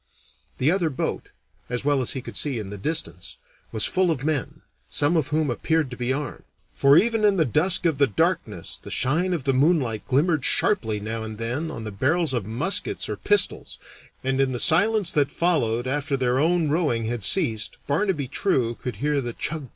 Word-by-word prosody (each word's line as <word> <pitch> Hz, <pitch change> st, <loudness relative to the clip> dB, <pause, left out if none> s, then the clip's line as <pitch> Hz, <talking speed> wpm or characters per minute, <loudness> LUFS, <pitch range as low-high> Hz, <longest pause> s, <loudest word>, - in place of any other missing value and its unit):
The 140 Hz, +5 st, +2 dB
other 180 Hz, -3 st, +1 dB
boat, 135 Hz, -, -4 dB, 0.4 s
as 125 Hz, +2 st, -4 dB
well 145 Hz, -2 st, +2 dB
as 125 Hz, -, -2 dB
he 130 Hz, -, -5 dB
could -, -, -9 dB
see 140 Hz, -5 st, -1 dB
in 105 Hz, -3 st, -6 dB
the 105 Hz, -, -6 dB
distance, 95 Hz, -, -3 dB, 0.3 s
was 110 Hz, -2 st, 0 dB
full 185 Hz, -1 st, +1 dB
of 145 Hz, -6 st, -2 dB
men, 150 Hz, -4 st, -2 dB, 0.3 s
some 145 Hz, +4 st, +1 dB
of 155 Hz, -4 st, +1 dB
whom 150 Hz, -2 st, 0 dB
appeared 155 Hz, +3 st, -1 dB
to -, -, -6 dB
be 125 Hz, +1 st, -2 dB
armed, 145 Hz, 0 st, -4 dB, 0.3 s
for 140 Hz, +2 st, +5 dB
even 225 Hz, +1 st, +2 dB
in 205 Hz, -2 st, +4 dB
the 160 Hz, -, +3 dB
dusk 165 Hz, -, +3 dB
of 160 Hz, -5 st, +1 dB
the 140 Hz, -, +4 dB
darkness 100 Hz, -, -1 dB
the -, -, -10 dB
shine 165 Hz, +8 st, 0 dB
of 170 Hz, -6 st, -2 dB
the 135 Hz, -, +1 dB
moonlight 130 Hz, -6 st, +1 dB
glimmered 150 Hz, +2 st, +1 dB
sharply 110 Hz, -, +1 dB
now 110 Hz, +2 st, -4 dB
and 110 Hz, -1 st, -7 dB
then 125 Hz, +8 st, -3 dB
on 130 Hz, -8 st, -7 dB
the 110 Hz, -, -5 dB
barrels 145 Hz, -, 0 dB
of 115 Hz, -6 st, -2 dB
muskets 190 Hz, -, -1 dB
or -, -, -3 dB
pistols, 415 Hz, -, +1 dB, 0.5 s
and 135 Hz, +1 st, 0 dB
in 135 Hz, -1 st, 0 dB
the 120 Hz, -, -3 dB
silence 200 Hz, -, +5 dB
that 145 Hz, -5 st, +1 dB
followed 120 Hz, -9 st, 0 dB
after 140 Hz, +1 st, -1 dB
their 125 Hz, 0 st, +1 dB
own 165 Hz, 0 st, +1 dB
rowing 145 Hz, -8 st, 0 dB
had 115 Hz, -1 st, -3 dB
ceased 110 Hz, -, +1 dB
Barnaby 150 Hz, -1 st, -1 dB
True 125 Hz, -5 st, 0 dB
could 125 Hz, -1 st, -6 dB
hear 145 Hz, +6 st, -1 dB
the 120 Hz, -2 st, -5 dB
chug! 150 Hz, +1 st, -3 dB
140 Hz, 200 wpm, -24 LUFS, 120-165 Hz, 0.5 s, for